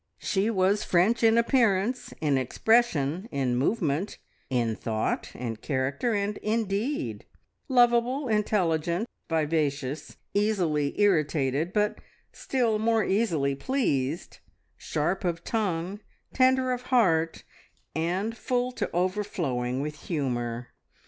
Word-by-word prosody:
She 200 +2 0
was 200 -1 +2
French 190 +7 +2
in 225 0 +5
appearance, 235 0 +2
in 150 -3 +2
expression, 175 - +1
in 130 -4 0
movement, 155 - 0 0.3
in 120 -3 0
thought, 110 -1 -2
in 115 -2 -4
character, 140 - -1
and 205 +1 -1
in 220 +1 0
deed; 195 - -3 0.4
lovable, 245 +2 +3
intelligent, 185 -3 +1 0.2
vivacious, 150 -3 -1 0.2
easily 180 -9 +1
irritated, 155 -5 +2
but 210 0 0 0.3
still 235 -5 0
more 225 0 +2
easily 170 -11 +1
pleased, 150 - -1 0.4
sharp 160 +6 -2
of 170 -2 -2
tongue, 195 -3 -2 0.3
tender 260 0 +3
of 250 -1 -2
heart, 165 -10 +2 0.5
and 185 +8 -1
full 250 0 -1
to - - -3
overflowing 170 -9 -1
with 150 +1 -6
humour. 120 -6 -2
185 Hz, 110 wpm, -27 LUFS, 145-225 Hz, 0.5 s, in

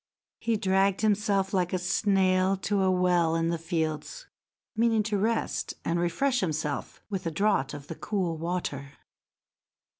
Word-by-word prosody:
He 230 -1 0
dragged 195 -1 +2
himself 205 -2 +1
like 180 -2 +1
a - - +2
snail 190 0 +2
to 200 +1 0
a 190 - +3
well 180 -3 +2
in 165 0 +1
the 170 -1 -1
fields, 165 - -3 0.5
meaning 225 -1 +3
to 210 -1 -1
rest 225 +3 -1
and 170 +1 0
refresh 245 +10 +1
himself 155 -6 -3
with 190 -4 -3
a - - -1
draught 195 -6 +1
of 140 -1 -9
the 165 - -6
cool 180 -2 -2
water. 155 -4 -4
185 Hz, 150 wpm, -28 LUFS, 165-205 Hz, 0.5 s, a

